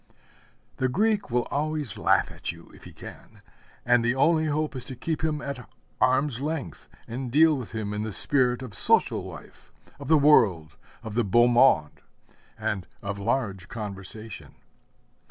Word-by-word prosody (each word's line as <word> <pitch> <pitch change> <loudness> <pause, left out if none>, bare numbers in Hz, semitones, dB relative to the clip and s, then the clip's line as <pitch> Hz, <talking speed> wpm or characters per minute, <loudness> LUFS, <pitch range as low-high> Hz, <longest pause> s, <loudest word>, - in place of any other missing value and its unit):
The 130 - +1
Greek 210 - +1
will 120 0 0
always 150 -4 -2
laugh - - +2
at - - -5
you - - -15
if - - -16
he - - -10
can, - - -13 0.4
and 120 -1 +4
the 120 +2 +1
only 160 +3 +3
hope 150 -1 -1
is 130 - -5
to 130 - -8
keep 160 +5 -3
him 150 -2 -1
at 135 -4 -6 0.3
arm's 130 0 +2
length, 155 0 -4 0.2
and 125 +1 -5
deal 155 +3 +5
with 125 -5 -7
him 105 -2 -3
in 105 - -3
the 110 0 -3
spirit 125 +3 +1
of 120 -5 -8
social - - +2
life, - - -12 0.3
of 140 - -8
the 160 - +5
world, 100 - +4 0.3
of 110 -2 -6
the 120 +2 +1
beau 120 +4 +4
monde, 120 - +3 0.6
and 95 -5 -3 0.2
of 100 0 -4
large 100 -4 -2
conversation. 105 0 -8
125 Hz, 165 wpm, -26 LUFS, 110-145 Hz, 0.6 s, deal